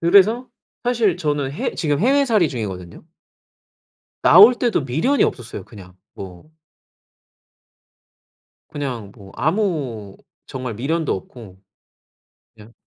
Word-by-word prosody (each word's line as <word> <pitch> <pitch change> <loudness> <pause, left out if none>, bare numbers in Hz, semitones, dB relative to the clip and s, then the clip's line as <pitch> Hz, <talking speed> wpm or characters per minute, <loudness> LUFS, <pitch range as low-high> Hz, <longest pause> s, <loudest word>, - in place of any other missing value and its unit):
그래서 200 +8 +4 0.4
사실 230 -7 +1
저는 145 -5 -2
해 - - -3
지금 145 -2 -1
해외살이 245 - +3
중이거든요. 95 -9 -7 1.2
나올 205 +9 +8
때도 240 - 0
미련이 160 - +1
없었어요 120 -5 -4
그냥. 90 -4 -14 0.2
뭐 95 - -11 2.2
그냥 125 -8 -5
뭐 100 -3 -14
아무 145 - -2 0.3
정말 130 -2 -6
미련도 155 +7 -1
없고 95 0 -11 1.0
그냥 110 +1 -16
145 Hz, 220 characters per minute, -20 LUFS, -, 2.2 s, 나올